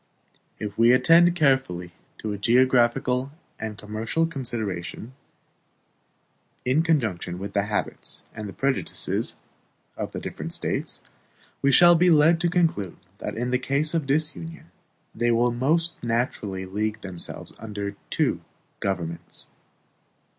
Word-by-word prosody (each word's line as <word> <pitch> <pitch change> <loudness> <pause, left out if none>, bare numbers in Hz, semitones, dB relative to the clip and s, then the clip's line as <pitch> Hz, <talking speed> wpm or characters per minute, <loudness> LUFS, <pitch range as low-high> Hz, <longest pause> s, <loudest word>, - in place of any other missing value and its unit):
If 105 0 -6
we 120 +2 +7
attend 165 +7 +6
carefully 130 - +1 0.3
to 105 -1 -3
geographical 125 +3 +3 0.3
and 110 -1 -5
commercial 110 +10 -1
considerations, 120 - -4 1.5
in 130 +5 +3
conjunction 110 - 0
with 100 +2 -6
the 100 -1 +1
habits 105 0 -3
and 105 -3 -7
prejudices 135 -1 -1 0.6
of - - -4
the - - -5
different - - -5
States, - - -2 0.6
we 140 - +4
shall 175 +5 +8
be 175 +2 +4
led 165 +1 +5
to 175 - +2
conclude 160 - 0 0.2
that - - -5
in 125 +2 -1
case 140 +4 0
of 160 -4 0
disunion 160 +3 -2 0.4
they 120 +1 +1
will 120 +1 +3
most 160 +7 0
naturally 115 -5 -1
league 105 +3 -2
themselves 95 -3 -7
under 105 -2 -5
two - - +1 0.4
governments. 85 -4 -4
120 Hz, 120 wpm, -25 LUFS, 105-150 Hz, 1.5 s, shall